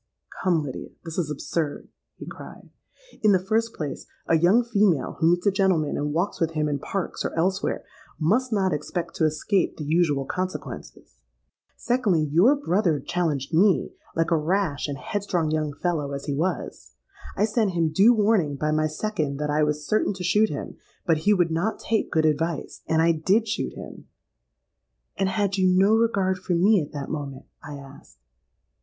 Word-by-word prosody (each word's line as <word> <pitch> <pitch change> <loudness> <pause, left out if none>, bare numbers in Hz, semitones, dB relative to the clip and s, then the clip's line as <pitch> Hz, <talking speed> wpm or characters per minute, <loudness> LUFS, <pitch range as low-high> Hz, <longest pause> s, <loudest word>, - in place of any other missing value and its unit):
'—'Come, 175 -4 +2
Lydia, 135 -3 -6 0.2
this 165 +1 -4
is 160 -4 -1
absurd,' 150 +1 -3 0.3
he - - -10
cried. - - -11 0.5
'In 210 -2 +5
the 185 -1 +1
first 225 +2 0
place, 145 -4 -5 0.2
a 165 - +3
young 180 +9 +4
female 200 - +1
who 160 - +4
meets 175 +2 +1
a 200 - +5
gentleman 185 -6 +1
and 150 0 -2
walks 175 +6 -1
with 165 0 +1
him 155 -1 0
in 145 -1 -1
Parks 195 +6 -4
or - - -3
elsewhere, 190 +4 0 0.4
must 230 +11 +1
not 195 -4 +1
expect 160 +4 -4
to 160 - +1
escape 160 +5 0
the 155 - -5
usual 150 -3 +1
consequences. 150 - -6 0.6
Secondly, 225 -10 +1
your 195 - +5
brother 185 - +1
challenged 155 -5 -2
me, 190 +4 +3 0.2
like 165 +1 0
a - - +5
rash 160 -2 0
and 140 -1 -4
headstrong 175 +1 -2
young 155 -1 -1
fellow 145 -2 -2
as 140 - -5
he 145 - -2
was: 170 +6 -3 0.4
I 210 - +3
sent 215 -3 0
him 165 -2 +1
due 215 +8 +5
warning 205 -9 +2
by 150 +2 -1
my 155 0 +2
second 155 -3 -2
that 150 0 -2
I 150 +1 +2
was 150 0 0
certain 215 -1 +1
to 185 - -6
shoot 210 +5 +3
him; 145 - -6 0.3
but 165 -2 +3
he - - +7
would 175 -3 +1
not 175 +7 -1
take 220 -1 -1
good 160 -1 +2
advice, 155 +1 -1
and 160 0 +2
I 170 - +5
did 190 +8 +1
shoot 220 - -2
him.'—'And 195 -1 -9
had 200 0 0
you 185 - +4
no 190 +3 +4
regard 200 -5 +1
for 180 0 -2
me 195 +3 +4
at 145 - -7
that 145 -2 -6
moment?' 140 -3 -5 0.2
I 145 0 -7
asked. 140 - -13
170 Hz, 180 wpm, -25 LUFS, 150-195 Hz, 0.6 s, he